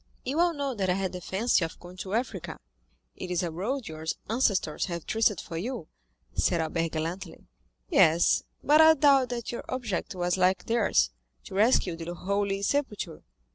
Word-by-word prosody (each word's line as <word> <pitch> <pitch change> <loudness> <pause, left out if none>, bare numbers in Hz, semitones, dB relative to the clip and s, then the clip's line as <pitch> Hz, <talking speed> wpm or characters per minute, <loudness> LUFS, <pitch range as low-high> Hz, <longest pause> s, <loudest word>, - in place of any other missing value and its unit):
"You 275 +5 -1
all 345 -1 +3
know 280 -2 -2
that 195 -5 -1
I 180 - +3
had 190 -1 -2
the 180 - -6
fancy 190 +2 +1
of 165 - -5
going 180 +1 -12
to 190 +3 -4
Africa." 225 -7 -3 0.6
"It 185 - -7
is 180 0 0
a 170 - -2
road 225 +10 -3
your 155 0 -7 0.3
ancestors 205 - +1
have 170 -3 -5
traced 220 -4 +2
for 165 - -6
you," 225 -2 -4 0.4
said 170 - +1
Albert 165 +1 -1
gallantly. 165 +2 -5 0.4
"Yes? 160 - +4 0.2
but 300 +2 +6
I 320 0 +8
doubt 275 -5 +4
that 240 -2 -4
your 240 - -5
object 220 -6 -3
was 180 0 0
like 185 +1 +2
theirs—to 60 - -1
rescue 200 -4 +3
the 170 +1 -6
Holy 200 +2 -1
Sepulchre." 210 - -2
190 Hz, 175 wpm, -28 LUFS, 170-240 Hz, 0.6 s, I